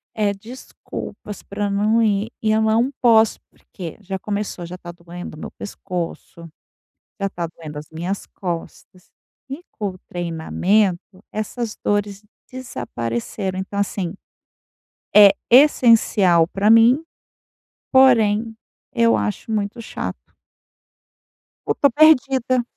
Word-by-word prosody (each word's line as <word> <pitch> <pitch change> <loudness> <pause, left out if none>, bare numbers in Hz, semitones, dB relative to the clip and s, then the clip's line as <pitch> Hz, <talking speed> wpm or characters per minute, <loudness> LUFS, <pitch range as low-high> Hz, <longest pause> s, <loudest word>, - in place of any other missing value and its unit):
eh, 210 -2 +1
desculpas 215 -1 -9
para 205 0 -3
não 210 +3 +2
ir, 210 +1 0
e 215 -1 +1
eu 220 0 +2
não 225 +5 +2
posso 225 -3 +4
porque, 175 -5 -10
já 190 0 -5
começou, 205 -4 -4
já 180 +2 -8
tá 175 - -9
doendo 170 -2 -10
meu - - -8
pescoço, 175 -3 -7 0.7
já 195 0 -1
tá 170 -3 -4
doendo 155 -2 -10
as 150 - -11
minhas 175 +5 -4
costas, 180 0 -7 0.4
e 280 +6 -6
com 205 -3 -3
o 185 - -14
treinamento, 180 +3 -1
essas 215 +1 -4
dores 205 0 -1 0.3
desapareceram. 185 - -4
Então 195 +1 -5
assim, 190 -3 -2 1.0
é 205 -2 +9 0.2
essencial 225 - +5
para 200 +3 +1
mim, 240 +7 +6 0.9
porém, 225 -4 +4 0.4
eu 230 0 +4
acho 210 +1 -3
muito 210 +2 -2
chato. - - -5 1.5
Eu - - 0
tô 280 - +4
perdida. 265 -4 +4
205 Hz, 115 wpm, -21 LUFS, 180-230 Hz, 1.5 s, é